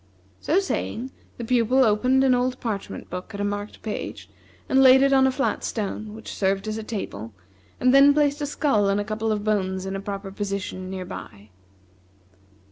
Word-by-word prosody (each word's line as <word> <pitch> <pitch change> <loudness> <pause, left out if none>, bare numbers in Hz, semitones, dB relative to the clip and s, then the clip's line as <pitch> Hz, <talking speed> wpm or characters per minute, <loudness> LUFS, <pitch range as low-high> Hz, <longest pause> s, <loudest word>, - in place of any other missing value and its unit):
So 330 - +1
saying, 260 - -3 0.3
the 240 - -5
Pupil 250 +2 +3
opened 250 +5 +3
an 265 -1 +4
old 250 +1 0
parchment 215 -4 -5
book 180 +4 -6
at - - -6
a - - -1
marked 205 +1 -4
page, 215 -2 -6 0.4
and 265 - +4
laid 265 0 +7
it 275 0 +3
on 265 0 +5
a - - +2
flat 270 +1 -1
stone, 215 0 -4
which 220 - -8
served 195 +1 0
as 215 +1 -3
a - - -6
table, 115 - -6 0.4
and 255 +1 +3
then 275 +1 +8
placed 290 0 +1
a 290 - -1
skull 275 -9 +1
and 200 +1 +1
a - - 0
couple 220 +1 -2
of 210 -1 -1
bones 190 -3 -1
in 190 0 -4
a 195 - -4
proper 200 -1 -6
position 195 -2 -4
near 185 -1 -5
by. 105 - -10
215 Hz, 195 wpm, -24 LUFS, 195-260 Hz, 0.4 s, then